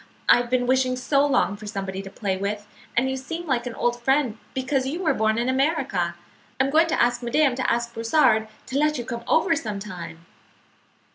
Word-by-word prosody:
I - - +7
have 245 0 -2
been 250 0 +1
wishing 255 0 +2
so 275 +2 +2
long 255 -7 +2
for 210 +1 -10
somebody 195 -1 -4
to 195 - -9
play 195 -1 -2
with, 205 +2 -3 0.3
and 250 +2 +3
you 265 - -1
seem 330 +6 -5
like 255 -5 -1
an 235 - -6
old 240 0 -1
friend 265 -3 +1 0.2
because 265 0 0
you 335 +7 -3
were 315 -4 +3
born 220 -2 +1
in 240 +1 0
America. 260 - 0 0.4
I'm 265 +1 +2
going 325 +2 +5
to - - 0
ask 240 +1 +2
madame 265 +3 +2
to 260 - +1
ask 235 0 -1
Brossard 230 -2 +3 0.2
to 265 +2 -2
let 300 0 +2
you 240 - -4
come 235 -1 -5
over 330 +1 +3
sometime." 190 - -6
245 Hz, 205 wpm, -24 LUFS, 220-275 Hz, 0.4 s, I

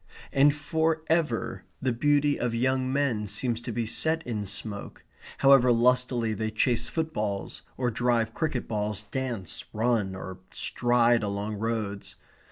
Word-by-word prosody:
And 140 +2 +6
for 160 +2 0
ever 160 -8 0 0.2
the 130 - 0
beauty 145 +4 +2
of 120 -1 -1
young 130 +2 +1
men 130 -7 0
seems 115 +3 -1
to 120 - -5
be 115 0 -2
set 160 +8 0
in 105 -4 -3
smoke, 100 +1 -4 0.3
however 135 -2 +6
lustily 120 -1 +2
they 110 0 -2
chase 115 +2 +1
footballs, 110 -12 -3 0.2
or 125 -1 0
drive 115 -1 +1
cricket 145 -4 -2
balls, 105 -1 -1
dance, 115 - -4
run, 110 -4 +1
or 95 0 -7
stride 120 -1 +2
along 105 +1 -3
roads. 110 -2 -3
120 Hz, 140 wpm, -27 LUFS, 110-130 Hz, 0.3 s, And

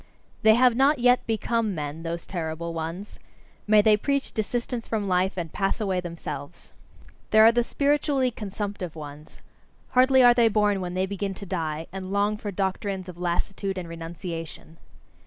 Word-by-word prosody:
They 220 -1 +6
have 250 0 +4
not 275 +4 +4
yet 245 0 +3
become 225 -2 0
men, 150 +1 -5
those 170 0 -4
terrible 165 -1 -4
ones: 165 +5 -6 0.5
may 210 0 +6
they 215 -1 +6
preach 280 +6 -1
desistance 235 +2 -3
from 210 -3 -2
life, 185 +1 +1
and 165 -3 -4
pass 195 +2 -1
away 190 -4 0
themselves! 170 -3 -8 0.6
There 220 0 +7
are 225 - +8
the 240 +1 +2
spiritually 280 0 +1
consumptive 200 -5 -5
ones: 150 -1 -10 0.5
hardly 260 +1 +5
are 245 0 +8
they 240 -1 +4
born 210 -2 +2
when 180 0 -4
they 185 +1 +1
begin 195 0 -4
to 200 - -9
die, 160 -4 -3
and 190 0 -6
long 205 +1 +1
for 210 0 -6
doctrines 190 -1 -3
of 175 -1 -10
lassitude 190 +2 -2
and 180 -2 -5
renunciation. 165 -1 -7
195 Hz, 165 wpm, -25 LUFS, 170-225 Hz, 0.6 s, are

